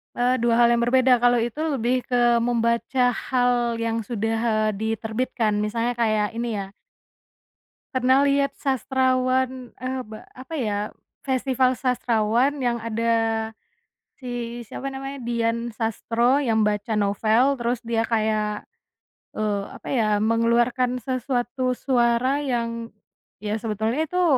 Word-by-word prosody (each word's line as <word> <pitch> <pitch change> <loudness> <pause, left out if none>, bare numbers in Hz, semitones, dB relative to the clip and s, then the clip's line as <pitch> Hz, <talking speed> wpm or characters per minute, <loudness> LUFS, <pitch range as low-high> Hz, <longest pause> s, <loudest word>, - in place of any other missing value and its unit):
Eee 250 +1 +2
2 235 0 +2
hal 235 0 +5
yang 235 - +3
berbeda 255 0 +4
kalau 245 0 +4
itu 240 +5 -3
lebih 250 0 +1
ke 240 -1 +3
membaca 235 +2 +1
hal 245 -1 0
yang 230 0 -1
sudah, 225 0 -2
eee, 215 0 +2
diterbitkan 220 +1 -1
misalnya 230 +3 -1
kayak 215 -2 +1
ini 235 0 -2
ya - - -9 1.3
Pernah 260 +2 +3
liat 280 0 +2
sastrawan 260 -1 0
e 255 - -4 0.2
be 215 -1 -10 0.2
apa 260 +6 -8
ya, 210 -5 -1 0.4
festival 260 -1 +1
sastrawan 245 +2 +1
yang 240 -2 0
ada, 230 0 0 1.1
si 240 -2 -5
siapa 275 0 -5
namanya? 270 +1 -6
Dian 235 0 -1
Sastro 230 +3 +1
yang 235 -6 +1
baca 210 +1 0
novel 220 +6 +2
terus 240 0 -1
dia 230 -1 -1
kayak, 215 -2 -1 0.7
eee, 210 -2 0 0.2
apa - - -10
ya 225 -4 +2
mengeluarkan 235 +3 +2
sesuatu 255 0 -2
suara 250 +2 +1
yang, 230 -3 -2 0.5
ya 210 0 -3
sebetulnya 225 +8 -1
itu 360 0 +1
240 Hz, 125 wpm, -24 LUFS, 225-255 Hz, 1.3 s, hal